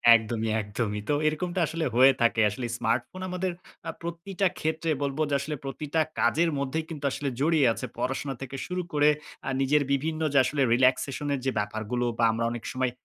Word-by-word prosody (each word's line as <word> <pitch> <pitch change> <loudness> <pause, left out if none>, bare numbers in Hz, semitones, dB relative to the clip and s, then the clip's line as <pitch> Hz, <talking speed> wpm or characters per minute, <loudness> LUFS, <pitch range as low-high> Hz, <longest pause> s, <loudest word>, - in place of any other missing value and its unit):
একদমই, 110 0 -1
একদমই। 105 0 -3
তো - - +3
এরকমটা 175 +4 -1
আসলে 165 0 -2
হয়ে 130 +2 +8
থাকে। 115 -1 +3
আসলে 110 +5 -5
স্মার্টফোন 120 +11 -1
আমাদের 180 0 -1 0.4
আ - - -1
প্রতিটা 175 +3 -1
ক্ষেত্রে 160 +1 -1
বলব 140 0 -1
যে - - -1
আসলে 150 +2 -3
প্রতিটা 150 +3 -3 0.2
কাজের 165 +8 +3
মধ্যেই 140 +4 -2
কিন্তু 150 -3 -6
আসলে 140 +1 -2
জড়িয়ে 155 -1 +3
আছে। - - -5
পড়াশোনা 135 +2 -2
থেকে 135 0 -6
শুরু 180 0 -2
করে 150 0 +5 0.4
আ - - +1
নিজের 145 +2 +3
বিভিন্ন 155 +3 0
যে - - +4
আসলে 140 +2 -1
রিল্যাক্সেশন 130 +3 +2
এর 140 - -1
যে 130 - +2
ব্যাপারগুলো 110 +4 -2
বা 120 - +1
আমরা 115 +1 -1
অনেক 120 -1 -5
সময় 130 -1 0
140 Hz, 185 wpm, -27 LUFS, 120-160 Hz, 0.4 s, হয়ে